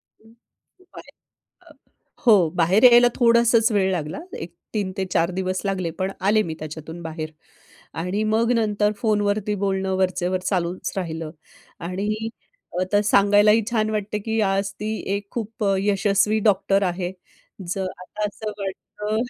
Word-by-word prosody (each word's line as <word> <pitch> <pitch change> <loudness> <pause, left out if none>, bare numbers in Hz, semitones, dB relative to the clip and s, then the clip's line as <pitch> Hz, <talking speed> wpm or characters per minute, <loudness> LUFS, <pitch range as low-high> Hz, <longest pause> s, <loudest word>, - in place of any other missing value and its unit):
खूप 235 - -25
आहे. - - -11 0.5
अ, - - -17 0.5
हो 195 -8 +6
बाहेर 185 +8 +3
यायला 240 0 +7
थोडासाच 235 -1 +4
वेळ 190 -2 +2
लागला. 160 - -3 0.2
एक 170 +1 -8 0.2
3 195 -3 -1
ते 190 - -1
4 170 +2 +2
दिवस 185 0 -1
लागले 185 -4 -1
पण 190 +1 -1 0.2
आले 215 +1 +4
मी 160 -4 -5
त्याच्यातून 160 +2 -8
बाहेर. 155 -1 -5 0.7
आणि 195 +5 -1
मग 230 +2 +2
नंतर 210 -2 +1
फोनवरती 210 -1 +1
बोलणं 190 -1 0
वरचेवर 185 -1 0
चालूच 180 -1 -2
राहिलं 160 -3 -4 0.6
आणि 210 +4 -2 0.5
आता 205 +3 +2
सांगायलाही 205 +2 +5
छान 215 -2 +1
वाटते, 210 0 -2
की 220 +2 -2
आज 195 0 +1
ती 210 - -3 0.3
एक 200 0 -5
खूप 225 -1 -5 0.2
यशस्वी 200 +1 +2
डॉक्टर 195 0 +2
आहे. 180 0 -2 0.6
जर 190 +2 -2 0.2
आता 210 +3 -6
असं 215 +1 -6
वाटतं 210 +2 -5
200 Hz, 140 wpm, -23 LUFS, 185-215 Hz, 0.7 s, यायला